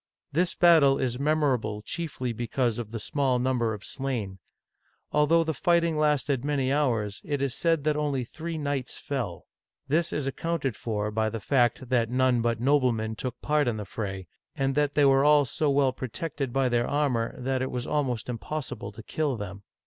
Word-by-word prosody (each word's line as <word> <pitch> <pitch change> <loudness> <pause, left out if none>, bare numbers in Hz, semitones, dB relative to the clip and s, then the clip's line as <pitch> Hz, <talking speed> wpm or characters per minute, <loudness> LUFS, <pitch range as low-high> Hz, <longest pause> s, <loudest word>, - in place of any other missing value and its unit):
This 175 +4 +1
battle 160 -6 +6
is 125 -2 -1
memorable 135 -8 +1
chiefly 130 -4 -3
because 120 0 -1
of 115 -3 -5
the 115 0 -5
small 130 +3 0
number 125 -2 +1
of 105 -1 -6
slain. 115 -9 -4 0.7
Although 150 +3 +4
the 160 -1 -1
fighting 170 +3 +2
lasted 145 -4 +1
many 140 -2 0
hours, 115 -8 0
it 145 -2 -2
is 135 -2 0
said 165 -1 +1
that 150 0 +1
only 145 -4 0
three 160 +7 -6
knights 145 -4 -3
fell. 125 -11 -4 0.4
This 165 +5 +1
is 150 - -2
ac 135 - -2
counted 165 -8 -1
for 105 -1 -2
by 110 +1 0
the 115 +1 -4
fact 120 +1 +1
that 120 -3 +2
none 125 -1 +2
but 115 -1 0
noblemen 120 -5 +2
took 125 +3 -5
part 150 -1 +2
in 115 -2 0
the 105 - -5
fray, 95 -2 -5 0.3
and 135 0 0
that 145 0 +1
they 145 - +5
were 135 0 +5
all 150 -1 +5
so 145 +4 0
well 140 -2 +3
protected 135 +2 -4
by 135 +1 +2
their 120 -1 +1
armor 130 -6 0
that 130 0 -1
it 130 - -1
was 125 -1 -3
almost 130 -6 -1
impossible 125 0 -5
to 115 - -10
kill 145 -2 -1
them. 100 -1 -7
130 Hz, 185 wpm, -27 LUFS, 120-150 Hz, 0.7 s, battle